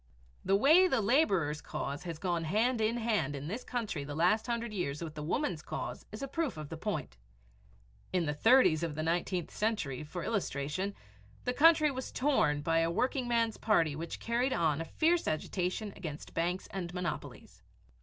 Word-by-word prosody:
The 195 Hz, +1 st, +3 dB
way 315 Hz, -, +6 dB
the 265 Hz, -8 st, +2 dB
laborer's 200 Hz, -, +2 dB
cause 140 Hz, +4 st, -4 dB
has 165 Hz, -2 st, -4 dB
gone 170 Hz, 0 st, -1 dB
hand 225 Hz, +7 st, +1 dB
in 220 Hz, +2 st, +1 dB
hand 215 Hz, -, 0 dB
in 140 Hz, +1 st, -5 dB
this 225 Hz, +9 st, -4 dB
country 220 Hz, -, -3 dB
the 145 Hz, +1 st, -6 dB
last 200 Hz, +8 st, +2 dB
hundred 235 Hz, -2 st, -2 dB
years 170 Hz, -5 st, -2 dB
with 160 Hz, -2 st, -6 dB
the 155 Hz, -, -6 dB
woman's 170 Hz, -, -1 dB
cause -, -, -6 dB
is 215 Hz, +5 st, -6 dB
a -, -, -2 dB
proof 290 Hz, -, -2 dB
of 155 Hz, -2 st, -6 dB
the 165 Hz, -, -5 dB
point. 160 Hz, -, -4 dB, 0.9 s
In 180 Hz, -2 st, +1 dB
the 150 Hz, -, -1 dB
30's 225 Hz, -, +5 dB
of 165 Hz, -3 st, -2 dB
the 155 Hz, -, -2 dB
nineteenth 175 Hz, +1 st, -1 dB
century, 205 Hz, -, -1 dB
for 165 Hz, +3 st, -6 dB
illustration, 190 Hz, -2 st, -2 dB, 0.5 s
the 250 Hz, -, 0 dB
country 310 Hz, +1 st, +6 dB
was 260 Hz, -1 st, -5 dB
torn 250 Hz, -, +2 dB
by 165 Hz, +1 st, +2 dB
a 165 Hz, 0 st, +2 dB
workingman's 235 Hz, -, 0 dB
party 165 Hz, -9 st, +2 dB
which 165 Hz, +2 st, -5 dB
carried 245 Hz, +3 st, 0 dB
on 160 Hz, -2 st, +1 dB
a -, -, -4 dB
fierce 330 Hz, -, +1 dB
agitation 185 Hz, +6 st, -2 dB
against 160 Hz, -5 st, -7 dB
banks 175 Hz, +3 st, -1 dB
and 180 Hz, -3 st, -4 dB
monopolies. 180 Hz, -3 st, -5 dB
185 Hz, 180 wpm, -32 LUFS, 155-235 Hz, 0.9 s, way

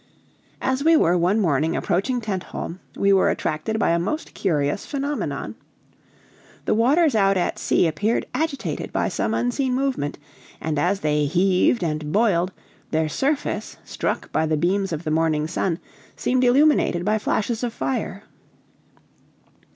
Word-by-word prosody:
As 260 Hz, +1 st, 0 dB
we 325 Hz, +1 st, +6 dB
were 175 Hz, -, +3 dB
one 180 Hz, +5 st, +2 dB
morning 160 Hz, -3 st, +1 dB
approaching 210 Hz, +7 st, 0 dB
Tentholm, 190 Hz, -3 st, -5 dB, 0.2 s
we 200 Hz, 0 st, +3 dB
were 190 Hz, -, +4 dB
attracted 155 Hz, +9 st, -2 dB
by 205 Hz, -, +2 dB
a 170 Hz, -, +2 dB
most 305 Hz, -, -3 dB
curious 150 Hz, -1 st, 0 dB
phenomenon. 285 Hz, +1 st, -3 dB, 1.1 s
The -, -, +2 dB
waters 280 Hz, +7 st, +3 dB
out 195 Hz, -3 st, +3 dB
at 175 Hz, -, -1 dB
sea -, -, +2 dB
appeared 200 Hz, +8 st, 0 dB
agitated 315 Hz, -3 st, -2 dB
by -, -, 0 dB
some 220 Hz, -, -1 dB
unseen 250 Hz, +1 st, 0 dB
movement, 260 Hz, -, -1 dB, 0.4 s
and 155 Hz, -2 st, -2 dB
as 195 Hz, +3 st, +1 dB
they 150 Hz, -1 st, +1 dB
heaved 185 Hz, -, +2 dB
and 155 Hz, -2 st, -2 dB
boiled, 190 Hz, -4 st, +2 dB, 0.4 s
their 155 Hz, 0 st, 0 dB
surface, 280 Hz, -, -2 dB
struck -, -, -3 dB
by 160 Hz, -, +1 dB
the 155 Hz, 0 st, +1 dB
beams 190 Hz, +4 st, 0 dB
of 160 Hz, 0 st, -3 dB
the 155 Hz, -, -2 dB
morning 155 Hz, -1 st, +1 dB
sun, 165 Hz, +1 st, -1 dB, 0.4 s
seemed 255 Hz, 0 st, +1 dB
illuminated 250 Hz, -, +3 dB
by 215 Hz, +1 st, +2 dB
flashes 225 Hz, +3 st, -1 dB
of 240 Hz, -, -1 dB
fire. 220 Hz, -5 st, -3 dB
195 Hz, 145 wpm, -23 LUFS, 165-245 Hz, 1.1 s, we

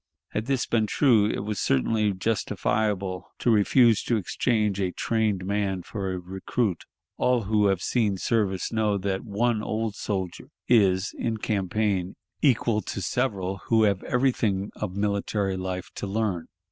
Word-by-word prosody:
Had 110 Hz, +3 st, -3 dB
this 135 Hz, -2 st, +1 dB
been 110 Hz, -2 st, +1 dB
true, 115 Hz, -5 st, +4 dB
it -, -, -2 dB
was 105 Hz, -1 st, -3 dB
certainly 105 Hz, -, +2 dB
justifiable 100 Hz, -2 st, -1 dB
to 120 Hz, -, +2 dB
refuse 115 Hz, +1 st, +4 dB
to 120 Hz, -, +2 dB
exchange 105 Hz, 0 st, 0 dB
a 95 Hz, -2 st, 0 dB
trained 105 Hz, -4 st, 0 dB
man 100 Hz, -2 st, -1 dB
for 95 Hz, -1 st, -4 dB
a 95 Hz, -, -2 dB
recruit. 95 Hz, +3 st, -2 dB, 0.3 s
All 125 Hz, -2 st, +2 dB
who 105 Hz, 0 st, +2 dB
have 95 Hz, -2 st, 0 dB
seen 105 Hz, -6 st, +1 dB
service 100 Hz, -1 st, 0 dB
know 105 Hz, -2 st, +1 dB
that 95 Hz, 0 st, -2 dB
one 115 Hz, +1 st, 0 dB
old 110 Hz, 0 st, -2 dB
soldier 95 Hz, -4 st, -4 dB, 0.2 s
is, 100 Hz, -4 st, +3 dB
in 115 Hz, -2 st, -1 dB
campaign, 100 Hz, -2 st, -1 dB, 0.3 s
equal 115 Hz, -5 st, +2 dB
to -, -, -5 dB
several 95 Hz, -3 st, -1 dB
who 110 Hz, -1 st, +3 dB
have 100 Hz, -3 st, +2 dB
everything 115 Hz, -6 st, +1 dB
of 100 Hz, -3 st, -4 dB
military 100 Hz, -1 st, 0 dB
life 95 Hz, 0 st, -4 dB
to 100 Hz, -, -3 dB
learn. 100 Hz, -5 st, -1 dB
105 Hz, 150 wpm, -26 LUFS, 95-110 Hz, 0.3 s, true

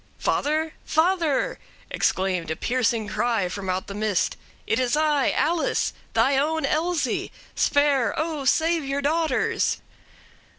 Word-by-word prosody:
"'Father? 310 Hz, +2 st, 0 dB
father!' 330 Hz, -3 st, +1 dB, 0.3 s
exclaimed 185 Hz, -3 st, 0 dB
a 160 Hz, -, -1 dB
piercing 230 Hz, 0 st, 0 dB
cry 220 Hz, -2 st, 0 dB
from 190 Hz, +1 st, -5 dB
out 185 Hz, +1 st, -1 dB
the 200 Hz, -, -7 dB
mist; 210 Hz, -2 st, 0 dB, 0.3 s
'it 225 Hz, -, 0 dB
is 255 Hz, +2 st, +1 dB
I! 300 Hz, -3 st, +2 dB
Alice! 330 Hz, +2 st, 0 dB, 0.2 s
thy 275 Hz, 0 st, +3 dB
own 315 Hz, +3 st, +1 dB
Elsie! 330 Hz, +2 st, 0 dB, 0.2 s
spare, 285 Hz, -4 st, +2 dB
O! 315 Hz, -2 st, -2 dB
save 325 Hz, +4 st, +2 dB
your 275 Hz, +1 st, -2 dB
daughters!' 315 Hz, -2 st, +1 dB
280 Hz, 125 wpm, -24 LUFS, 220-315 Hz, 0.3 s, thy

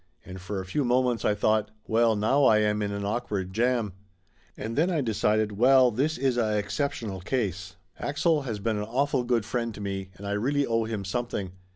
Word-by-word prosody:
And 95 Hz, 0 st, -9 dB
for 95 Hz, +2 st, -4 dB
a 95 Hz, -, -5 dB
few 120 Hz, +10 st, -1 dB
moments 125 Hz, -1 st, +1 dB
I 105 Hz, -, +2 dB
thought 110 Hz, +1 st, +1 dB, 0.2 s
"Well, 115 Hz, 0 st, +3 dB
now 110 Hz, +7 st, +2 dB
I 110 Hz, -, +6 dB
am 105 Hz, 0 st, +1 dB
in 100 Hz, -1 st, -1 dB
an 100 Hz, 0 st, -3 dB
awkward 100 Hz, -4 st, -2 dB
jam." 115 Hz, -2 st, +1 dB, 0.6 s
A'nd 115 Hz, +2 st, -4 dB
then 165 Hz, +5 st, +2 dB
I 170 Hz, -4 st, 0 dB
decided, 110 Hz, -2 st, +1 dB
"Well, 125 Hz, +4 st, +5 dB
this 140 Hz, +8 st, 0 dB
is 130 Hz, -1 st, +1 dB
a 110 Hz, -2 st, +1 dB
exceptional 110 Hz, -3 st, -2 dB
case. 95 Hz, -4 st, -2 dB, 0.2 s
Axel 155 Hz, +2 st, +1 dB
has 115 Hz, -6 st, -4 dB
been 105 Hz, +2 st, -1 dB
an 105 Hz, -, -2 dB
awful 135 Hz, +3 st, 0 dB
good 120 Hz, -3 st, 0 dB
friend 115 Hz, -1 st, -2 dB
to -, -, -9 dB
me 95 Hz, -1 st, -4 dB
and 100 Hz, -, -10 dB
I 100 Hz, -, -3 dB
really 140 Hz, +8 st, +1 dB
owe 115 Hz, -2 st, 0 dB
him 110 Hz, -3 st, -4 dB
something. 100 Hz, -3 st, -3 dB
110 Hz, 205 wpm, -27 LUFS, 105-125 Hz, 0.6 s, I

